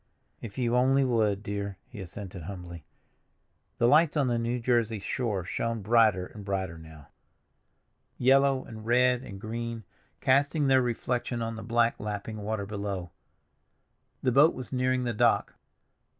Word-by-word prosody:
"If 110 0 -8
you 120 -2 +1
only 135 +2 +4
would, 110 -5 +1
dear," 100 -1 -4
he 110 -5 -9
assented 95 0 -8
humbly. 85 -2 -8 0.9
The 120 - +3
lights 155 +3 +4
on 145 - +3
the 120 -1 +1
New 120 +2 -1
Jersey 115 -2 +1
shore 105 -1 -2
shone 115 +2 -2
brighter 110 -4 +4
and 105 +2 -11
brighter 95 -4 -3
now, 80 -3 -14 1.1
yellow 135 +1 +3
and 110 -1 -10
red 125 +2 +3
and 100 -6 -9
green, 115 +1 -5 0.4
casting 140 +3 +2
their 135 -1 +5
reflection 120 0 -2
on 115 0 -3
the 110 - -7
black 120 0 +1
lapping 105 +1 -5
water 105 0 -3
below. 100 -4 -4 1.1
The 130 - +3
boat 145 +6 +5
was 130 +1 -8
nearing 130 0 +1
the 120 -1 -1
dock. 120 +1 +2
115 Hz, 150 wpm, -28 LUFS, 100-125 Hz, 1.1 s, their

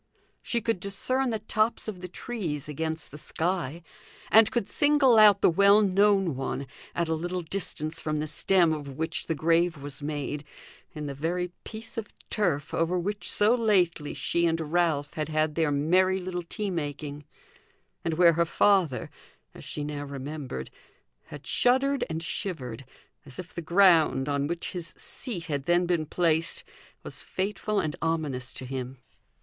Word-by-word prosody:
She 235 - -1
could 225 -4 0
discern 250 +8 +2
the 225 - 0
tops 215 +2 0
of 195 -5 -5
the 180 - -5
trees 175 - -4
against 160 +1 -4
the 150 - -8
sky, 170 -1 -2 0.5
and 220 -1 +7
could 240 -6 -1
single 285 -5 +4
out 210 -2 +7
the - - +6
well 200 +4 +6
known 195 -4 +3
one, 135 +1 -3 0.3
at 170 -1 0
a 160 - 0
little 175 +3 -3
distance 160 -3 -3
from 155 -1 -1
the 150 - -1
stem 170 +2 +2
of 140 -3 -6
which 160 +1 -2
the 165 - 0
grave 165 +2 +2
was 140 0 -8
made, 145 0 -3 0.5
in 150 -1 -5
the 140 - -4
very 175 +5 -2
piece 225 +1 -6
of 210 - -6 0.2
turf 165 -9 0
over 165 +2 +1
which 200 +4 -2
so 210 +3 +5
lately 185 -10 +1
she 170 0 +1
and 165 -1 -2
Ralph 160 -5 +1
had 155 -1 -3
had 155 0 +1
their 160 -1 +1
merry 180 +7 +3
little 180 -1 -4
tea 200 +4 -4
making; 145 -3 -4 0.8
and 165 -1 -1
where 170 0 +6
her 170 +1 +2
father, 175 -6 +2 0.4
as - - -12
she 150 - -5
now 145 -1 -4
remembered, 140 - -6 0.5
had 145 -1 -11
shuddered 265 +3 +2
and 160 0 -3
shivered, 135 - -4 0.4
as 135 -2 -9
if 180 -1 -8
the 170 - -4
ground 165 -6 +4
on 140 0 0
which 170 +1 -3
his 175 -2 -6
seat 195 -10 -5
had 145 -4 -3
then 175 +2 +3
been 170 -3 0
placed 165 - 0 0.4
was - - -5
fateful 205 +2 -2
and 155 -2 -2
ominous 150 -6 -1
to 130 - -7
him. 130 0 -5
165 Hz, 165 wpm, -27 LUFS, 150-195 Hz, 0.8 s, and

